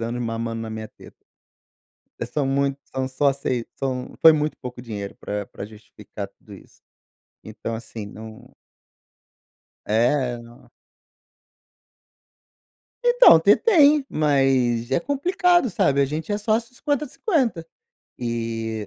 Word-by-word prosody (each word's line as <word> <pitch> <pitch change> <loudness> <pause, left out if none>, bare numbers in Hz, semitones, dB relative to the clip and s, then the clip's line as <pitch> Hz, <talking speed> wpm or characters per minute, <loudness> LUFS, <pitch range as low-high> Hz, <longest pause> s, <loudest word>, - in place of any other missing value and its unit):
anos 120 +1 -3
mamando 115 0 -3
na 110 - -6
minha 110 0 -6
teta. - - -16 1.1
É - - -1
são 145 -3 -2
mui 140 0 0
são 130 0 -4
só 140 +1 +2
sei 130 -3 -3
são 130 -2 -4
foi 160 - +9
muito 150 0 -1
pouco 125 -1 -8
dinheiro 105 -4 -7
pra 105 -1 -5
pra 100 - -8
justificar 105 -1 -10
tudo - - -16
isso. - - -18 0.6
Então 110 +1 -6
assim, 110 -1 -7
não 110 +1 -11 1.4
É, 125 +4 +2
é, - - -7
no 120 0 -16 2.3
Então, 485 - +7
ter 200 +5 +6
tem, 300 - +5
mas 135 -5 +1
é 135 - +2
complicado, 350 - +2
sabe, 140 -5 +2
a 140 - +5
gente 155 +7 -5
é 205 - 0
sócio 225 +3 -1
50, 290 +2 -1
50 255 - -1 0.5
e 115 -2 -3
135 Hz, 130 wpm, -23 LUFS, -, 2.3 s, foi